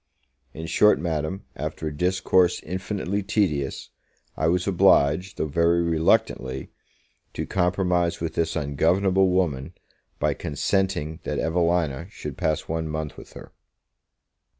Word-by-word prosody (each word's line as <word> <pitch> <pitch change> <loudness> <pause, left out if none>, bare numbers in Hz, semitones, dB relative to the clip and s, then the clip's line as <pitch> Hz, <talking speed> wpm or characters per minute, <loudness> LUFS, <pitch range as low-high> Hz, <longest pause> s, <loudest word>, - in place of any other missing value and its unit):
In 80 - -7
short, 105 +6 +4
Madam, 80 +2 -2
after - - -5
a 75 -1 -3
discourse 90 +1 +2
infinitely 95 +3 -3
tedious, 90 -10 -1 0.4
I 80 - 0
was 90 +2 +1
obliged, 90 -1 +3
though - - 0
very 85 +3 +2
reluctantly, 75 -5 +1 0.6
to - - -2
compromise 90 -2 +1
with 80 -1 -3
this 85 0 -1
ungovernable 90 +7 +2
woman, 80 -8 -1 0.4
by - - +1
consenting 80 0 -1
that - - -3
Evelina 85 -2 0
should 75 -9 -7
pass 80 -1 0
one 80 0 -3
month 75 -2 -4
with - - -13
her. - - -11
85 Hz, 125 wpm, -24 LUFS, 75-95 Hz, 0.6 s, short